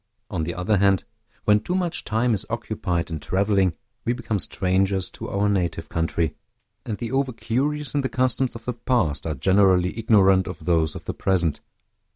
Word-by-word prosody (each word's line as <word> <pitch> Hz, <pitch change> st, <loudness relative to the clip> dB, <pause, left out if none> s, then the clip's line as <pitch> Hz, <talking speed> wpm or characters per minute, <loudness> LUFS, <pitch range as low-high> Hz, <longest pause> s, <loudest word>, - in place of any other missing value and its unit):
On 85 Hz, -5 st, -1 dB
the 85 Hz, -, -4 dB
other 100 Hz, +4 st, +1 dB
hand, 100 Hz, -1 st, +3 dB, 0.4 s
when 105 Hz, 0 st, +5 dB
too 180 Hz, +11 st, -3 dB
much 175 Hz, -3 st, -1 dB
time 115 Hz, +2 st, +1 dB
is 105 Hz, -1 st, +2 dB
occupied 95 Hz, -7 st, -2 dB
in 80 Hz, -, -3 dB
traveling, 95 Hz, -1 st, +1 dB, 0.3 s
we 120 Hz, -, +1 dB
become 115 Hz, -4 st, -2 dB
strangers 95 Hz, +1 st, +1 dB
to -, -, -7 dB
our 100 Hz, +1 st, +1 dB
native 85 Hz, -5 st, -1 dB
country; 80 Hz, -1 st, -1 dB, 0.5 s
and 105 Hz, -, -2 dB
the 115 Hz, -1 st, -5 dB
over 135 Hz, 0 st, +1 dB
curious 140 Hz, +6 st, -1 dB
in 145 Hz, -, +1 dB
the 130 Hz, -, -2 dB
customs 130 Hz, 0 st, 0 dB
of 115 Hz, 0 st, -9 dB
the 125 Hz, -, -1 dB
past 115 Hz, -, 0 dB
are 80 Hz, -, -2 dB
generally 95 Hz, +4 st, +3 dB
ignorant 95 Hz, -4 st, +4 dB
of 90 Hz, -, -7 dB
those 80 Hz, -3 st, +2 dB
of -, -, -8 dB
the -, -, -3 dB
present. 85 Hz, -6 st, 0 dB
100 Hz, 185 wpm, -24 LUFS, 90-115 Hz, 0.5 s, when